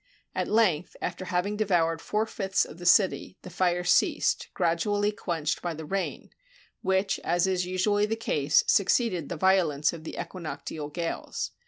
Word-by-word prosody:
At - - -1
length, 190 -7 +1
after 185 - -4
having 185 +4 -1
devoured 170 -6 +1
four 215 +1 0
fifths 195 -3 0
of 165 - -12
the 175 - -3
city, 185 0 +3
the 185 - -9
fire 180 0 +1
ceased, 180 - +2
gradually 205 +4 +1
quenched 165 -6 -2
by 170 -2 -3
the 160 0 -7
rain, 195 +4 -3 0.5
which, 190 +1 +1
as 175 +1 +2
is 185 -1 0
usually 205 +3 +1
the 225 - -1
case, 150 -9 +2
succeeded 195 - +2
the 175 - -4
violence 165 -5 +2
of 165 -2 -9
the - - -7
equinoctial 155 -3 -6
gales. 165 +2 -4
180 Hz, 160 wpm, -27 LUFS, 165-195 Hz, 0.5 s, city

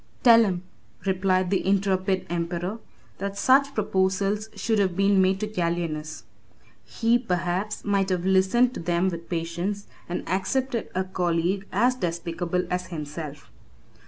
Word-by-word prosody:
"Tell 230 -2 +8
him," 180 -3 -2 0.4
replied 185 -1 +1
the 195 - +1
intrepid 190 -1 +1
emperor, 175 +4 -3 0.4
"that 200 +1 -4
such 275 +5 +4
proposals 195 +1 0
should 225 -2 0
have 185 -3 +1
been 195 0 +4
made 190 0 +2
to 215 - -1
Gallienus; 170 - -2 0.6
he, 225 - +1
perhaps, 185 -1 -2
might 200 -1 +1
have 180 -1 -1
listened 190 +7 +3
to - - -6
them 175 +2 +1
with 170 -2 -7
patience, 175 +4 -3 0.2
and 175 - -4
accepted 240 +6 -1
a 185 - +1
colleague 185 +1 -1
as 240 +6 +3
despicable 175 -3 -2
as 180 0 -1
himself." 150 -3 -7
190 Hz, 135 wpm, -25 LUFS, 175-200 Hz, 0.6 s, Tell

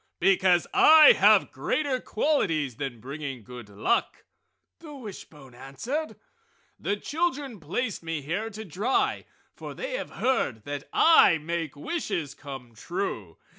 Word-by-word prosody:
"Because 185 -2 +3
I 315 +6 +8
have - - +4
greater 285 -4 -1
qualities 165 - 0
than 135 -5 -5
bringing 135 0 -7
good 120 -1 -11
luck!" 105 - -1 0.5
the 305 -3 -11
wishbone 160 - -11
answered. 220 - -5 0.6
"The 205 - -1
children 290 - -2
placed 195 - -3
me 165 -3 -4
here 190 +10 -3
to 220 0 -8
dry, 205 - -1 0.3
for - - -9
they - - -5
have - - -7
heard 135 - 0
that 145 +2 -6
I 320 - +6
make 165 -1 -4
wishes 175 - -3
come 135 -5 -10
true! 115 - -5
170 Hz, 130 wpm, -26 LUFS, -, 0.6 s, I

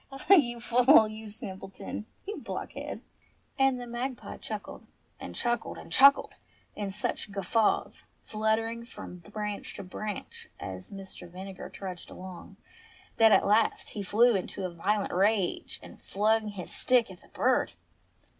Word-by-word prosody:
Ah, 270 +8 +3
you 240 -10 +4
fool! 240 0 +6
you 215 0 -8
simpleton! 195 0 -7 0.2
you 415 +2 -4
blockhead - - -6 0.3
!" - - -31
And 270 -1 +4
the 245 - -6
magpie 240 +2 -4
chuckled, - - -7 0.3
and - - -7
chuckled, 240 -1 -1
and - - -11
chuckled 275 +1 +6 0.4
in 205 -2 -3
such 205 +1 -3
guffaws, 205 +2 +1 0.2
fluttering 220 +2 0
from 235 -6 -9
branch 210 +4 -5
to - - -6
branch 205 +2 -6
as 95 -1 -7
Mr. 195 -3 -10
Vinegar 190 +2 -8
trudged 185 -3 -7
along, 185 -1 -10 0.6
that 225 -1 +7
at - - +6
last 215 +2 +2
he 210 - -4
flew 225 +4 +4
into 190 0 -3
a 180 - -4
violent 200 +4 0
rage 195 0 +1
and - - -13
flung 215 +2 +1
his 200 -4 -6
stick 245 -5 +3
at 180 - -13
the - - -19
bird. - - +1
215 Hz, 145 wpm, -29 LUFS, 195-235 Hz, 0.6 s, that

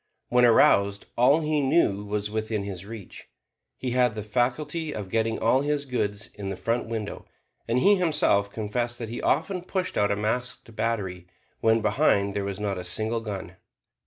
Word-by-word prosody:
When 125 0 +5
aroused, 100 -3 +4
all 135 +6 +4
he 150 -1 +1
knew 135 -8 +2
was 105 0 -3
within 110 -1 -2
his 100 -1 -6
reach; 110 -4 -10 0.5
he 125 - -3
had 125 -2 +2
the 105 - -4
faculty 130 +8 -1
of 100 -3 -6
getting 115 0 +1
all 120 +4 +3
his 145 0 0
goods 110 -5 -2
in 100 -2 -6
the 95 - -3
front 115 +4 -1
window. 110 -2 -5 0.4
And 115 - +1
he 200 +9 +5
himself 150 - +2
confessed 120 +3 -2
that 115 -2 -5
he 120 - -5
often 180 +4 0
pushed 185 +1 -2
out 105 0 +2
a - - +2
masked 115 +2 -3
battery, 95 -7 -2 0.3
when 110 0 +3
behind 100 -1 +2
there 100 - -2
was 100 0 -4
not 100 -3 -2
a - - -5
single 110 +6 -1
gun. 95 -4 -6
110 Hz, 180 wpm, -26 LUFS, 100-125 Hz, 0.5 s, When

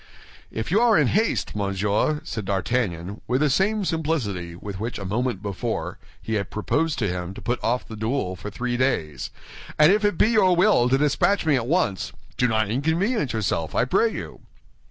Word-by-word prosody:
"If 110 +7 -4
you 210 +5 +4
are 235 -3 +5
in 145 -6 +3
haste, 220 - 0
monsieur," 100 +8 0
said 110 -9 -5
D'Artagnan, 95 -2 -1
with 130 +3 +1
the 150 -2 +3
same 200 +6 +1
simplicity 120 - -2
with 95 +2 -7
which 115 +3 -3
a 100 - -6
moment 110 0 -1
before 100 -3 -3 0.2
he 110 - -5
had 100 -2 -1
proposed 145 +9 -1
to 110 - 0
him 90 +1 -4
to - - -9
put 120 +1 -2
off 125 +2 0
the 110 - -8
duel 110 -3 -2
for 105 - -7
three 120 +3 -3
days, 80 - -1 0.5
"and 150 +3 +7
if 210 +1 +2
it 205 -5 +2
be 215 - +4
your 195 -6 +4
will 175 - +4
to 135 - +4
dispatch 150 +8 +2
me 155 -3 +4
at 120 -3 -1
once, 135 - 0 0.2
do 125 - +2
not 110 -2 +1
inconvenience 160 - 0
yourself, 90 -8 -1
I - - +3
pray - - +2
you." - - -7
120 Hz, 195 wpm, -24 LUFS, 100-160 Hz, 0.5 s, and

